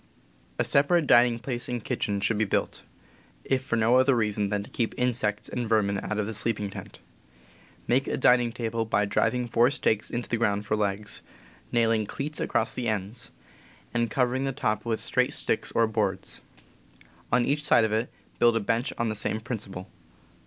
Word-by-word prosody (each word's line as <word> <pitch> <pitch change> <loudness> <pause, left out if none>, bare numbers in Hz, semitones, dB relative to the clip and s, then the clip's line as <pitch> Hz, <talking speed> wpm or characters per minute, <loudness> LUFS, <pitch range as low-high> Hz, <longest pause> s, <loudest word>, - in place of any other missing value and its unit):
A - - +2
separate 150 +4 +3
dining 120 -2 +5
space 120 0 -5
and 120 -3 -4
kitchen 100 -1 -1
should 110 +1 +1
be - - +3
built, 100 - -1 0.6
if 135 -1 +1
for 130 - -2
no 115 +2 +4
other 130 +1 +4
reason 105 -3 0
than 105 -1 -1
to - - -13
keep 115 -2 -2
insects 110 -4 0
and 120 -3 -4
vermin 100 -3 +2
out 110 - -4
of 105 - 0
the 110 - -4
sleeping 105 -2 0
tent. - - -9 0.9
Make 130 +3 +1
a - - -1
dining 125 -2 +4
table 115 -1 -2
by 105 -2 +1
driv 100 +5 +1
ing 125 -1 -2
four 120 +1 +4
stakes 110 -7 0
into 120 0 -4
the 115 - -1
ground 105 -2 0
for 105 - 0
legs, 105 0 -2 0.5
nailing 115 -3 +2
cleats 150 +7 -4
across 110 - 0
the 125 -2 -3
ends, 105 +1 -3 0.6
and 120 -1 +1
covering 130 0 0
the 135 - 0
top 110 -4 -2
with 115 -1 -1
straight - - 0
sticks - - -2
or 115 - +4
boards. 105 -4 -2 0.9
On 120 0 +3
each 145 +1 0
side 150 - +5
of 110 -1 0
it 110 +3 -1 0.3
build 120 -1 +5
a - - +2
bench 115 +4 -1
on 115 - 0
the 110 - -2
same 110 - -1
principle. 100 -5 -6
115 Hz, 190 wpm, -27 LUFS, 105-125 Hz, 0.9 s, dining